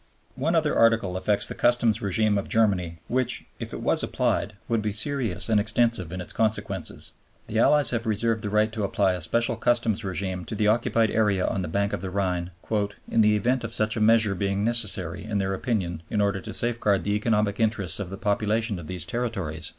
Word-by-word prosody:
One 160 +6 -1
other 155 -2 +2
Article 115 -5 +3
affects 100 +2 +1
the - - -2
Customs 120 -2 +2
RÈgime 105 +1 +2
of - - -7
Germany 95 -7 +1
which, 130 0 -1
if - - -6
it - - -6
was - - +2
applied, 105 - -1
would 115 -2 0
be 105 0 -1
serious 115 -2 -2
and 110 -2 +3
extensive 110 -5 +1
in 95 - -5
its 90 - -7
consequences. 105 -3 -2 0.3
The 110 - -2
Allies 150 +4 +4
have 115 -1 -2
reserved 110 +1 0
the 105 - -2
right 105 +1 +1
to 110 -2 -2
apply 100 -1 +1
a 90 - -4
special 115 +7 +1
customs 120 -3 +1
rÈgime 95 -1 -3
to - - -5
the 105 0 +1
occupied 115 0 +2
area 105 -4 +2
on 95 - -1
the 90 - -3
bank 100 +5 -1
of - - -3
the 95 - -4
Rhine, 90 -2 -1 0.6
"in 115 - +4
the 105 0 +4
event 120 +5 0
of 115 - -4
such 110 -1 0
a 110 - -2
measure 110 -1 +4
being 100 +1 -1
necessary 105 -7 0
in 110 -1 -3
their 95 -1 -1
opinion 95 -5 -2
in 105 - -1
order 100 -1 +1
to - - -7
safeguard 110 -6 +2
the 100 - -1
economic 105 -1 0
interests 105 -6 0
of 100 -3 -4
the 95 - -7
population 105 0 0
of 80 - -9
these 90 -2 -3
territories." 95 -10 -3
105 Hz, 210 wpm, -25 LUFS, 95-115 Hz, 0.6 s, Allies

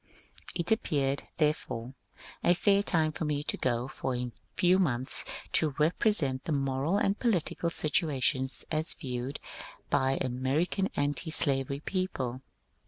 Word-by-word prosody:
It 170 +2 0
appeared, 140 -10 0
therefore, 150 -6 -1 0.5
a 175 - +5
fair 200 +2 +3
time 160 -6 +2
for 160 - -5
me 150 -1 -1
to - - +2
go 125 -1 0
for 130 -1 -3
a 125 0 -3 0.3
few 185 0 +4
months 130 -7 0 0.3
to 155 -3 +3
repre 160 +9 +2
sent 135 -10 +1
the - - -2
moral 140 +5 +1
and 200 0 +1
political 180 -6 0
situation 150 -5 +1 0.2
as 155 +1 0
viewed 130 0 -4 0.5
by 135 0 +3
American 135 +10 0
antislavery 145 -1 +2
people. 135 -10 -3
145 Hz, 130 wpm, -30 LUFS, 130-170 Hz, 0.5 s, a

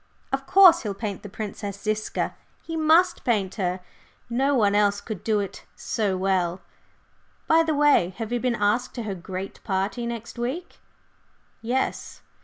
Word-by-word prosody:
Of 270 0 -2
course, 365 -3 +7
he'll 205 -4 -4
paint 200 -2 -4
the 205 - -9
Princess 200 -1 -6
Ziska 215 +1 -2 0.3
he 330 - -5
must 325 +3 +3
paint 200 -6 0
her, 180 0 -1 0.5
no 270 +4 +2
one 205 -5 +3
else 205 0 +3
could 210 -3 -7
do 215 -2 +1
it 200 -2 -5
so 200 -4 -1
well. 185 -2 0 0.9
By 325 +1 +5
the 320 -2 0
way, 285 -12 +3
have 225 -1 -5
you 245 - 0
been 250 0 0
asked 210 +3 0
to 240 - -4
her 210 -2 -3
great 185 +1 -7
party 200 +4 -1
next 235 0 -6
week?" 265 +9 -4 0.8
"Yes." 250 +3 -2
215 Hz, 160 wpm, -25 LUFS, 195-260 Hz, 0.9 s, course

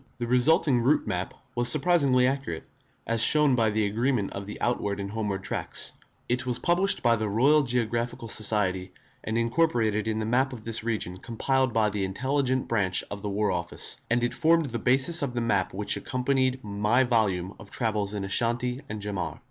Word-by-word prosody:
The 120 - -3
resulting 125 +2 +3
route 135 +6 +2
map 90 0 -3 0.2
was 120 0 +2
surprisingly 140 -5 +3
accurate, 135 -11 -2 0.4
as 115 -1 +3
shown 150 -1 +6
by 115 -3 +2
the 105 0 0
agreement 115 +1 -1
of 100 0 -6
the 105 - -8
outward 105 -4 -1
and 100 0 -5
homeward 105 -3 -3
tracks, - - -2 0.3
It 125 +1 0
was 125 -2 -1
published 180 +7 +1
by 115 -1 +4
the 110 -1 -2
Royal 135 +9 +4
Geographical 120 -1 -2
Society, 95 -4 0 0.3
and 110 +1 -2
incorporated 115 -4 +1
in 110 -1 -1
the 110 - -2
map 130 +4 +1
of 115 -3 -9
this 115 -1 -2
region 110 -6 -3
compiled 130 +5 -1
by 110 -2 +1
the 100 -1 -2
Intelligence 130 +6 -1
Branch 95 -5 +1
of 100 - -5
the 105 - -4
War 105 +1 0
Office, 85 -1 -3
and 120 +1 +1
it 120 - 0
formed 165 0 +3
the 120 -3 -4
basis 135 +8 +3
of 130 -4 -3
the - - 0
map 100 -5 0
which 100 +2 -1
accompanied 130 0 -1
my 105 +5 +1
volume 100 -7 0
of 110 - -12
Travels 105 -3 -1
in 100 - -3
Ashanti 120 +5 0
and 105 -2 -6
Jaman. 100 -3 -4
115 Hz, 190 wpm, -26 LUFS, 105-130 Hz, 0.4 s, shown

